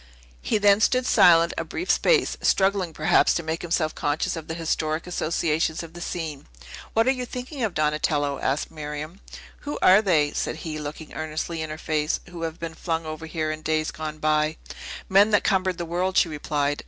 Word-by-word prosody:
He 140 - +1
then 205 0 +4
stood 255 +2 +3
silent 175 -7 +5
a - - -1
brief 335 - -2
space, 485 - +3
struggling, 195 -3 +2
perhaps, 160 +2 +3
to 170 - -1
make 160 +1 -3
himself 165 -2 0
conscious 145 +3 -1
of 165 -2 -7
the 160 - -4
historic 160 -1 -1
associations 165 -2 -1
of 165 -1 -11
the 175 - -9
scene. 160 -6 -5 0.5
"What 225 +1 +3
are - - +6
you 255 -1 -3
thinking 250 +3 -6
of, 215 -5 -1
Donatello?" 150 -2 0
asked 135 +3 -1
Miriam. 155 +3 -6 0.4
"Who 290 - -5
are 190 +3 +7
they," 155 -8 +2
said - - -2
he, 155 -1 -4
looking 150 +1 -7
earnestly 155 +1 -4
in 155 - -4
her 155 - -5
face, 155 -1 -1
"who 170 -1 -8
have 165 0 -4
been 165 -1 -5
flung 165 -1 -3
over 155 +1 -6
here 155 -1 -2
in 155 0 -6
days 155 0 0
gone 155 -1 -6
by?" 155 0 +1 0.5
"Men 200 +3 +5
that 210 -1 +3
cumbered 185 -2 +1
the 175 - -3
world," 180 +3 -1
she 170 - +4
replied. 145 -1 -1
160 Hz, 195 wpm, -25 LUFS, 155-185 Hz, 0.5 s, are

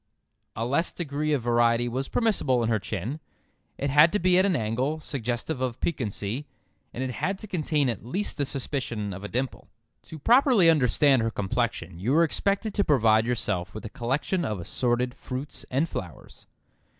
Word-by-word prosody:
A 115 - -2
less 145 +8 +1
degree 150 -2 -2
of 140 -5 +1
variety 120 0 +3
was 130 +3 -2
permissible 145 - +1
in 115 - 0
her 110 -2 +2
chin. 110 - -4 0.6
It 140 0 -1
had 150 +4 +6
to - - +3
be 180 +1 +3
at 190 - +4
an 185 - +1
angle 125 +6 -1
suggestive 125 0 -3
of 125 -2 -2
piquancy, 120 -2 -3 0.4
and 130 - -4
it 130 - -2
had 190 +10 -2
to 215 - -8
contain 155 -6 0
at 120 -4 -3
least 185 - -3
the 145 - +1
suspicion 125 -7 -2
of 95 +2 -8
a - - -4
dimple. 125 +3 -4 0.4
To 160 - -9
properly 235 - +5
understand 135 -2 +3
her 115 - +1
complexion 100 -5 -2
you 115 +9 0
were 165 +2 +5
expected 200 +6 0
to 200 - +1
provide 115 - +3
yourself 105 -7 -2
with 110 - -7
a - - -5
collection 135 - -1
of 105 - -2
assorted 125 +7 0
fruits 130 +3 -6
and 140 +6 +1
flowers. 90 - -8
130 Hz, 180 wpm, -26 LUFS, 115-155 Hz, 0.6 s, had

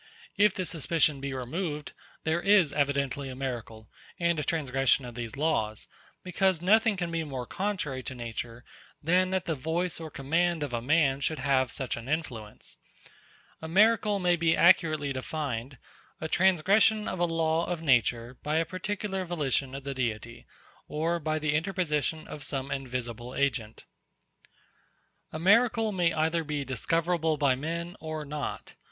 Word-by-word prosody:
If 205 -1 +4
this 185 -2 -3
suspicion 155 -3 +1
be 140 0 -3
removed, 150 +4 -4 0.3
there 160 +2 +1
is 195 -7 +4
evidently 140 -1 0
a 130 - -6
miracle, 120 -5 -5 0.3
and 170 -2 +2
a - - -1
transgression 135 -3 +1
of 120 - -8
these 115 -1 -6
laws; 110 -9 0 0.4
because 185 -1 +1
nothing 215 +4 +4
can 175 -2 -2
be 165 -1 -1
more 135 -5 -5
contrary 185 - -3
to 130 - -6
nature 120 0 -6 0.4
than 180 +4 +3
that 190 -1 -1
the 165 - 0
voice 160 +5 -2
or 160 -1 -6
command 160 +4 0
of 140 -4 -4
a 120 - -1
man 140 0 +3
should 155 +2 -1
have 135 -2 +2
such 130 -1 -2
an 115 +3 -8
influence. 125 -9 -4 0.8
A 160 - -5
miracle 210 +3 +4
may 180 -2 +3
be 165 -1 +2
accurately 155 -5 +4
defined, 135 -2 -4 0.4
_a 160 - -3
transgression 195 +5 +3
of 185 - -3
a 175 - +3
law 165 0 +1
of 170 -2 -3
nature 125 -3 +2
by 150 +1 -1
a 165 +1 +2
particular 190 +1 -3
volition 140 -6 -1
of 135 - -6
the 140 0 -4
Deity, 115 -2 -4 0.4
or 165 +3 -1
by 155 0 -1
the 155 -1 0
interposition 160 -3 -1
of 150 - -8
some 135 -1 -4
invisible 125 -3 -4
agent_. 125 -6 -1 1.5
A - - -5
miracle 225 +5 +4
may 175 -4 +2
either 160 +1 +1
be 150 -2 -3
discoverable 165 +5 0
by 140 -3 +3
men 170 +6 -4
or 155 -1 -5
not. 150 +1 -5
155 Hz, 160 wpm, -28 LUFS, 135-175 Hz, 1.5 s, If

